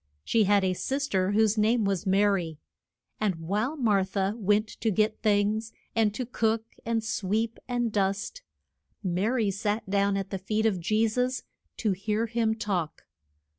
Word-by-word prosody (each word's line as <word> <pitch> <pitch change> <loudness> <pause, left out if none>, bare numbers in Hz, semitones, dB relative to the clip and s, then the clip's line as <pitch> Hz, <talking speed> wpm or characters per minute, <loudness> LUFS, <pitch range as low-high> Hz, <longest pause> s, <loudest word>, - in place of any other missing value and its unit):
She 220 -2 +3
had 200 0 +4
a 185 -1 +2
sis 275 +9 -2
ter, 190 +1 +1
whose 220 0 +3
name 220 +1 +3
was 195 0 -1
Ma 195 +2 +4
ry, 180 -6 +1 0.6
and 210 -4 +1
while 205 - -2
Mar 210 -7 +3
tha 190 +1 -1
went 210 -1 +2
to 225 - +1
get 215 +1 +1
things 215 +1 +1 0.2
and 220 -2 +3
to 255 - -2
cook, 225 -2 0 0.2
and 225 -1 -1
sweep, 220 +2 -1
and 240 -2 0
dust, 200 - -1 0.6
Ma 185 +2 0
ry 230 -4 +1
sat 205 +2 -2
down 200 0 +2
at 195 0 -4
the 195 - -3
feet 215 +4 -1
of 205 -5 +2
Je 215 +6 +2
sus 250 +3 -1 0.3
to 215 - +1
hear 210 +4 -1
him 225 -1 0
talk. 185 -8 -3
210 Hz, 170 wpm, -28 LUFS, 195-225 Hz, 0.6 s, had